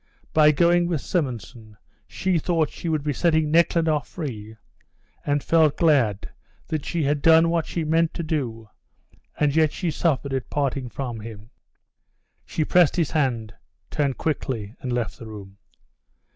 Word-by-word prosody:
By 155 -1 +6
going 170 +3 +3
with 170 -4 -1
Simonson 120 - -4 0.3
she 185 -3 0
thought 160 -2 0
she 170 - -5
would 155 -3 0
be 145 -1 -1
setting 160 0 +1
Nekhludoff 165 -2 +2
free, 110 - -7 0.7
and 145 0 +1
felt 160 -3 +3
glad 130 - +2 0.4
that 155 -3 -4
she 170 -2 -1
had 145 +1 0
done 165 +1 +5
what 165 -2 0
she 170 - -3
meant 160 +1 +2
to 170 - -3
do, 125 -8 -3 0.7
and 150 -1 +2
yet 155 -2 +4
she 175 -4 -2
suffered 140 -4 -1
at 130 -2 -3
parting 135 -3 -2
from 120 -3 -5
him. 110 +1 -10 1.0
She 155 - -1
pressed 175 -2 +4
his 165 -5 0
hand, 120 -7 -1 0.4
turned 140 -4 0
quickly 120 -9 -3
and 125 - -4
left 120 -2 -2
the 115 - -9
room. 100 -2 -11
150 Hz, 155 wpm, -24 LUFS, 120-165 Hz, 1.0 s, By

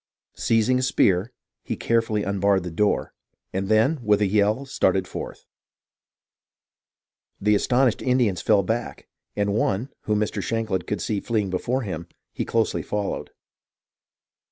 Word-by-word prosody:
Seizing 115 +3 +2
a - - 0
spear, 100 -4 +2 0.3
he - - -4
carefully 115 -3 +1
unbarred 100 -1 +1
the 90 - -5
door, 105 +5 0 0.4
and 95 +1 -2
then, 115 +8 +3
with 105 -2 +3
a 105 - +3
yell, 105 +6 +2
started 95 -8 +1
forth. - - -7 1.9
The 105 +1 +3
astonished 125 +3 +2
Indians 125 -7 +1
fell 105 -2 +3
back, 115 +5 -3 0.3
and 100 -1 0
one, 110 +3 0 0.2
whom 105 -1 +1
Mr. 105 -1 -1
Shankland 110 -2 -2
could 105 -4 -2
see 105 -2 -1
fleeing 105 -3 -1
before 125 +8 -1
him, 85 -5 -5 0.3
he - - -3
closely 115 -1 0
followed. 105 -1 -3
105 Hz, 135 wpm, -24 LUFS, 100-115 Hz, 1.9 s, then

